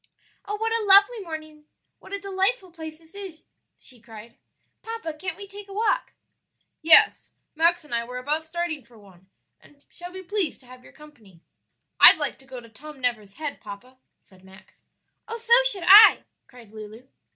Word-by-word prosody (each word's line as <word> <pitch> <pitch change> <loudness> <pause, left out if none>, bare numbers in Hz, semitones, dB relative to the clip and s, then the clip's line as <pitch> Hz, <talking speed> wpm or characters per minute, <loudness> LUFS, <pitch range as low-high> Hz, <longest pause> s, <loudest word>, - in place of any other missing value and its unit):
"Oh, 415 - -4
what 445 +2 -3
a 455 -1 -1
lovely 405 +4 +5
morning! 310 -4 -10 0.3
what - - -16
a 400 - -3
delightful 390 +1 -2
place 320 -2 -10
this 325 +1 -22
is!" 385 -5 -10 0.3
she 245 -3 -11
cried. 225 0 -14 0.5
"Papa, 450 -8 -7
can't 330 +3 -7
we 400 0 -10
take 405 +1 -12
a 395 - -12
walk?" 450 +4 -1 0.7
"Yes, 320 0 +5 0.2
Max 335 +2 +1
and 300 - -10
I 235 0 0
were 250 +1 -9
about 295 +5 -3
starting 320 -3 -5
for 235 0 -21
one, 190 -3 -21 0.3
and 285 -1 -24
shall 355 +1 -11
be 375 +1 -10
pleased 375 -4 -3
to - - -22
have 250 0 -16
your - - -17
company." 225 - -19 0.6
"I'd - - +9
like - - -4
to 265 - -20
go 260 -1 -10
to 235 - -15
Tom 295 +6 -14
Never's 220 -6 -4
Head, 300 -2 -6
papa," 250 +6 -12 0.3
said 185 -1 -22
Max. 190 +1 -20 0.5
"Oh, 455 +1 -6
so 465 0 0
should 400 -8 -1
I!" 420 +3 +8 0.2
cried 240 -4 -17
Lulu. 220 +3 -12
315 Hz, 185 wpm, -23 LUFS, 245-390 Hz, 0.7 s, I'd